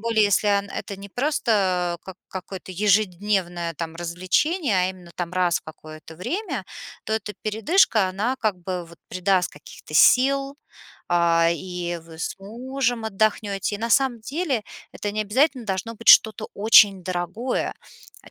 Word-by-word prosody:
более, 225 Hz, -1 st, +2 dB
если 205 Hz, +1 st, +2 dB
ан 200 Hz, -1 st, +1 dB
это 200 Hz, -, -6 dB
не 200 Hz, +1 st, -10 dB
просто 195 Hz, -, 0 dB
как 190 Hz, -1 st, -9 dB
какое-то 190 Hz, 0 st, -8 dB
ежедневное, 185 Hz, -3 st, 0 dB
там, 165 Hz, +1 st, -6 dB
развлечение, 185 Hz, -, 0 dB
а 185 Hz, -, +1 dB
именно, 180 Hz, -2 st, -13 dB
там, 175 Hz, -1 st, -4 dB
раз 180 Hz, -2 st, +2 dB
в -, -, -21 dB
какое-то 155 Hz, 0 st, -12 dB
время, 280 Hz, -, -4 dB, 0.4 s
то 220 Hz, -, -3 dB
эта 210 Hz, -1 st, -2 dB
передышка, 220 Hz, -, +3 dB
она 210 Hz, +8 st, -1 dB
как 215 Hz, -5 st, 0 dB
бы 180 Hz, 0 st, -4 dB
вот 170 Hz, 0 st, -16 dB
придаст 185 Hz, 0 st, +1 dB
каких-то 145 Hz, +1 st, -14 dB
сил, 275 Hz, -, +4 dB, 0.5 s
а, 170 Hz, -1 st, +3 dB
и 175 Hz, 0 st, -4 dB
вы 165 Hz, 0 st, -14 dB
с -, -, -3 dB
мужем 240 Hz, +3 st, -3 dB
отдохнете. 205 Hz, -1 st, 0 dB
И, -, -, -14 dB
на 230 Hz, +2 st, -3 dB
самом 260 Hz, -2 st, +2 dB
деле, 275 Hz, -1 st, -2 dB, 0.3 s
это 205 Hz, -1 st, -4 dB
не 215 Hz, -, -2 dB
обязательно 255 Hz, +4 st, +1 dB
должно 195 Hz, +4 st, -3 dB
быть 230 Hz, +1 st, -5 dB
что-то 220 Hz, -2 st, +6 dB
очень 200 Hz, -3 st, +6 dB
дорогое, 185 Hz, +8 st, -2 dB, 0.5 s
а, -, -, -16 dB
200 Hz, 155 wpm, -23 LUFS, 180-230 Hz, 0.5 s, что-то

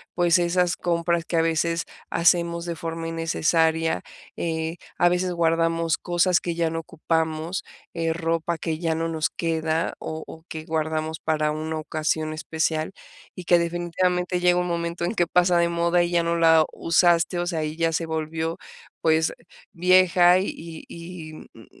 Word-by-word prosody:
pues 175 Hz, 0 st, +4 dB
esas 175 Hz, 0 st, +1 dB
compras 170 Hz, -1 st, 0 dB
que 170 Hz, -, -3 dB
a -, -, +5 dB
veces 165 Hz, +1 st, 0 dB, 0.3 s
hacemos 170 Hz, 0 st, +2 dB
de 170 Hz, -1 st, -3 dB
forma 165 Hz, +1 st, -5 dB
innecesaria, 165 Hz, -, +1 dB, 0.4 s
eh, 160 Hz, 0 st, -2 dB, 0.2 s
a 175 Hz, -, +5 dB
veces 180 Hz, 0 st, 0 dB
guardamos 165 Hz, 0 st, +1 dB
cosas 175 Hz, 0 st, +2 dB
que 170 Hz, -1 st, -3 dB
ya 165 Hz, -1 st, +1 dB
no 165 Hz, -, -2 dB
ocupamos, 160 Hz, +1 st, -2 dB, 0.3 s
eh, 165 Hz, -1 st, -1 dB
ropa 165 Hz, 0 st, -1 dB
que 160 Hz, -1 st, -3 dB
ya 165 Hz, -2 st, 0 dB
no 165 Hz, +1 st, -1 dB
nos 155 Hz, -3 st, 0 dB
queda 160 Hz, -1 st, -1 dB
o 160 Hz, 0 st, -5 dB
o 160 Hz, 0 st, -11 dB
que 160 Hz, -1 st, -6 dB
guardamos 160 Hz, -1 st, -2 dB
para 155 Hz, -1 st, 0 dB
una 155 Hz, +1 st, -3 dB
ocasión 155 Hz, 0 st, -2 dB
especial 160 Hz, +1 st, -2 dB, 0.4 s
y 180 Hz, -, -7 dB
que 175 Hz, -1 st, +5 dB
definitivamente 180 Hz, +1 st, 0 dB
llega 180 Hz, 0 st, +3 dB
un 180 Hz, -, -1 dB
momento 170 Hz, 0 st, -2 dB
en 175 Hz, -, -1 dB
que 175 Hz, -6 st, +1 dB
pasa 180 Hz, 0 st, +3 dB
de 170 Hz, 0 st, +2 dB
moda 170 Hz, +1 st, +2 dB
y 175 Hz, 0 st, 0 dB
ya 170 Hz, -1 st, +2 dB
no 170 Hz, 0 st, 0 dB
la 160 Hz, -1 st, +5 dB
usaste, 170 Hz, +1 st, +2 dB
o 175 Hz, -, -1 dB
sea, 165 Hz, -3 st, -1 dB
y 155 Hz, 0 st, -4 dB
ya 165 Hz, -1 st, +1 dB
se 165 Hz, -, -1 dB
volvió 160 Hz, +1 st, -3 dB, 0.4 s
pues 160 Hz, 0 st, +3 dB, 0.4 s
vieja 180 Hz, 0 st, +5 dB
y 165 Hz, -4 st, -6 dB
y, 170 Hz, -2 st, -9 dB, 0.2 s
mm, -, -, -15 dB
165 Hz, 170 wpm, -24 LUFS, 160-175 Hz, 0.4 s, a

